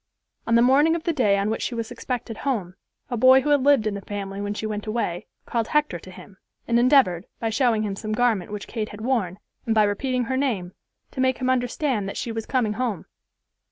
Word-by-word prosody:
On 230 Hz, -, +3 dB
the 235 Hz, -, +6 dB
morning 290 Hz, +6 st, +4 dB
of 335 Hz, -, -4 dB
the 335 Hz, -, 0 dB
day 210 Hz, -9 st, +3 dB
on 200 Hz, +2 st, 0 dB
which 225 Hz, -, -2 dB
she 240 Hz, -, -2 dB
was 230 Hz, -1 st, -4 dB
expected 240 Hz, -3 st, -5 dB
home, 210 Hz, -11 st, -2 dB, 0.4 s
a -, -, 0 dB
boy 260 Hz, +3 st, +7 dB
who 295 Hz, -, -2 dB
had 290 Hz, -2 st, +4 dB
lived 275 Hz, -4 st, +4 dB
in 215 Hz, -, 0 dB
the 200 Hz, -, -5 dB
family 195 Hz, 0 st, -5 dB
when 205 Hz, 0 st, -3 dB
she 220 Hz, -, -4 dB
went 210 Hz, 0 st, -4 dB
away, 215 Hz, -6 st, -2 dB, 0.2 s
called 230 Hz, -2 st, -1 dB
Hector 300 Hz, -12 st, 0 dB
to 185 Hz, -, -13 dB
him, 190 Hz, +1 st, -13 dB, 0.3 s
and 235 Hz, 0 st, +3 dB
endeavored, 240 Hz, -, +4 dB
by 225 Hz, -1 st, -1 dB
showing 230 Hz, -3 st, +2 dB
him 200 Hz, -2 st, -2 dB
some 215 Hz, +2 st, -5 dB
garment 215 Hz, -5 st, +1 dB
which 210 Hz, -1 st, -6 dB
Kate 220 Hz, -2 st, -4 dB
had 210 Hz, +1 st, -10 dB
worn 220 Hz, -7 st, -1 dB, 0.3 s
and 225 Hz, -, +1 dB
by 215 Hz, -, +5 dB
repeating 250 Hz, +5 st, 0 dB
her 260 Hz, +3 st, -2 dB
name, 210 Hz, -10 st, -1 dB, 0.4 s
to 260 Hz, -, -3 dB
make 260 Hz, -1 st, +2 dB
him 255 Hz, 0 st, 0 dB
understand 245 Hz, -4 st, -1 dB
that -, -, -6 dB
she 235 Hz, -, -3 dB
was 225 Hz, -1 st, -5 dB
coming 240 Hz, -5 st, +1 dB
home. 225 Hz, -5 st, -3 dB
225 Hz, 230 wpm, -24 LUFS, 205-255 Hz, 0.4 s, boy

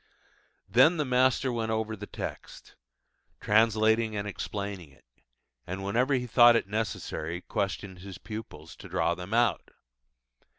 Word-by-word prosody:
Then 130 Hz, -, +5 dB
the 150 Hz, -, 0 dB
master 130 Hz, 0 st, +2 dB
went 115 Hz, -1 st, -2 dB
over 110 Hz, 0 st, -1 dB
the 105 Hz, 0 st, -9 dB
text, -, -, -8 dB, 0.7 s
translating 110 Hz, +1 st, +3 dB
and 100 Hz, 0 st, -3 dB
explaining 100 Hz, -4 st, -5 dB
it, 65 Hz, -2 st, -24 dB, 0.6 s
and 95 Hz, +2 st, -5 dB
whenever 125 Hz, +8 st, +1 dB
he 125 Hz, -1 st, -1 dB
thought 120 Hz, 0 st, +6 dB
it 115 Hz, -, +1 dB
necessary 90 Hz, -5 st, -3 dB
questioned 100 Hz, -2 st, -4 dB
his 95 Hz, -1 st, -9 dB
pupils, 110 Hz, +4 st, -9 dB
to -, -, -11 dB
draw 85 Hz, -, +1 dB
them 90 Hz, +3 st, -8 dB
out. 115 Hz, -4 st, +1 dB
110 Hz, 135 wpm, -28 LUFS, 95-120 Hz, 0.7 s, thought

